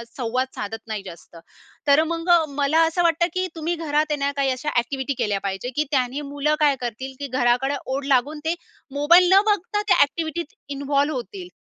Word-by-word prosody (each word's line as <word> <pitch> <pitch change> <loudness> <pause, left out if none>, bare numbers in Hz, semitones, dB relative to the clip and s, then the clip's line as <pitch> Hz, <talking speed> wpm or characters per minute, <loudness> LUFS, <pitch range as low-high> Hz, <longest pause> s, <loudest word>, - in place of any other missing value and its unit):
संवाद 255 +1 -1
साधत 210 +2 -4
नाही 215 -2 -4
जास्त. 170 -1 -12 0.5
तर 285 +2 +5
मग 330 +2 -3 0.3
मला 290 +3 +3
असं 350 +2 0
वाटतं 340 0 +3
की 370 0 -1
तुम्ही 330 +2 -2
घरात 305 -2 0
आहे - - +2
ना, 280 0 0
काही 275 -1 +1
अशा 260 +4 -3
एक्टिव्हिटी 265 +3 -3
केल्या 205 -2 0
पाहिजे, 195 +5 -3
की 300 - +2
त्यानी 260 0 0
मुलं 295 +1 +1
काय 295 -2 +4
करतील, 250 +3 -5
की 285 - -4
घराकडे 255 +2 +1
ओढ 270 +1 -3
लागून 280 +3 +1
ते 330 +2 +1 0.4
मोबाईल 340 +6 +5
न 390 - +7
बघता 415 -1 0
त्या - - +5
एक्टिव्हिटीत 315 +3 -4 0.2
इन्व्हॉल्व्ह 285 +1 0
होतील. 355 +9 -6
285 Hz, 185 wpm, -23 LUFS, 255-325 Hz, 0.5 s, न